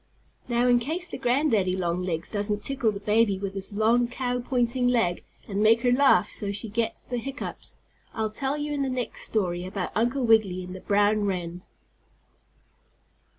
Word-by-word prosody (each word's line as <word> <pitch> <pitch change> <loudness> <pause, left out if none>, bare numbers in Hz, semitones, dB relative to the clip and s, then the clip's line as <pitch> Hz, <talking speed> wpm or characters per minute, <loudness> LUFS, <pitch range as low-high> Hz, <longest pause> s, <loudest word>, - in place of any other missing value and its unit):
Now 240 0 +1
in 245 -1 +5
case 320 +9 -3
the - - -7
granddaddy 240 -8 +2
longlegs 175 -2 -2
doesn't 205 0 -2
tickle 265 -5 0
the 200 - -6
baby 210 0 +2
with 195 0 -4
his 195 +1 -5
long 225 +4 +2
cow 245 0 -2
pointing 245 0 0
leg 225 -8 +1 0.2
and 200 0 -2
make 225 +2 +5
her 245 0 +2
laugh 245 -8 +4
so 200 -1 -3
she 210 +2 -3
gets 225 +2 -1
the 245 -1 -3
hiccoughs, 275 +4 -6 0.3
I'll 220 -1 -2
tell 270 +5 -1
you 295 0 -3
in 285 - -1
the 270 - 0
next 255 -2 -3
story 180 -5 -1
about 185 0 -4
Uncle 245 +4 +1
Wiggily 210 -5 +3
and 180 0 -8
the - - -7
brown 205 +1 +2
wren. 180 -2 -3
220 Hz, 175 wpm, -26 LUFS, 195-245 Hz, 0.3 s, in